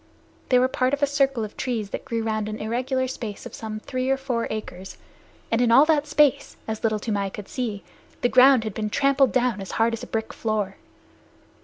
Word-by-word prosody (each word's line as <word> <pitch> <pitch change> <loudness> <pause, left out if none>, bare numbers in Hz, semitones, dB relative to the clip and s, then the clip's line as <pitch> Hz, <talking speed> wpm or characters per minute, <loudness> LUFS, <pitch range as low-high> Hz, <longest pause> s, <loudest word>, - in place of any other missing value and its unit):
They 250 - +5
were 255 +1 +4
part 260 0 +1
of 285 - -5
a - - +8
circle 275 -5 +1
of 210 - -11
trees 225 -6 -3
that - - -5
grew 230 -1 -2
round 215 -1 -2
an 215 - -5
irregular 255 +4 -1
space 225 -5 -6
of - - -9
some 215 -1 -6
three 255 +2 -3
or 270 - +2
four 250 -4 -2
acres, 190 -3 -6 0.5
and 230 +1 +2
in 245 - +3
all 270 +5 +7
that 305 -2 +2
space, 295 -2 +2
as 220 -1 -4
Little 220 -1 +2
Toomai 205 -2 -2
could 200 +1 -9
see, 225 -6 -4 0.4
the - - +3
ground 255 -1 +6
had 215 -2 -4
been 215 +1 -3
trampled 275 +2 +3
down 245 -5 +1
as 195 - -7
hard 230 +1 +2
as 230 - -4
a - - -7
brick 220 0 -3
floor. 210 -3 -2
230 Hz, 215 wpm, -24 LUFS, 215-260 Hz, 0.5 s, a